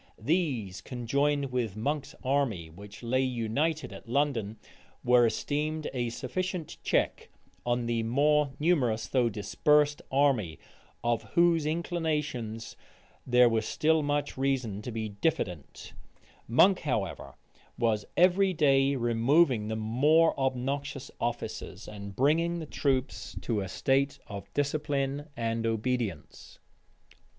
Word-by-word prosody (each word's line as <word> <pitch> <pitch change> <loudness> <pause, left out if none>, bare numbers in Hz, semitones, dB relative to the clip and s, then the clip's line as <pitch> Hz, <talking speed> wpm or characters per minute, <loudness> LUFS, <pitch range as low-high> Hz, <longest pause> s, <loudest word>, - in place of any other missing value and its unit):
These, 130 - -1
conjoined 140 +3 -1
with 115 -5 -2
Monk's 145 +6 -2
army, 130 - 0
which 100 +6 -12
lay 130 +3 +1
united 130 +6 -1
at 115 - -12
London, 120 -6 0 0.5
were 120 -1 +5
esteemed 150 +5 -2
a 120 -2 -1
sufficient 170 +7 -4
check - - 0 0.4
on 120 0 +1
the 115 -1 0
more 145 +5 +2
numerous, 130 -9 +1
though 125 -3 +2
dispersed 145 +8 +2
army, 130 - +2 0.5
of 120 -1 +1
whose 170 -3 +4
inclinations 150 -9 -2 0.5
there 125 0 +6
was 115 -2 0
still 160 0 +2
much 145 -2 -2
reason 130 -7 -1
to 120 - -6
be 110 -1 -3
diffident 100 - -3 0.5
Monk, 180 - +5
however, 120 -10 -3 0.4
was 110 -3 +1
every 185 +2 +4
day 140 -3 +3
removing 120 +1 +3
the 110 - -2
more 140 +10 +3
obnoxious 135 +1 -2
officers, 115 -4 -4
and 100 -1 -8
bringing 165 +5 +2
the 165 - -5
troops 135 -3 -2
to 110 -4 -1
a 95 - -4
state 135 +7 +1
of 100 -1 -8
discipline 145 -1 -1
and 115 0 -1
obedience. 115 -6 -3
130 Hz, 120 wpm, -29 LUFS, 115-150 Hz, 0.5 s, there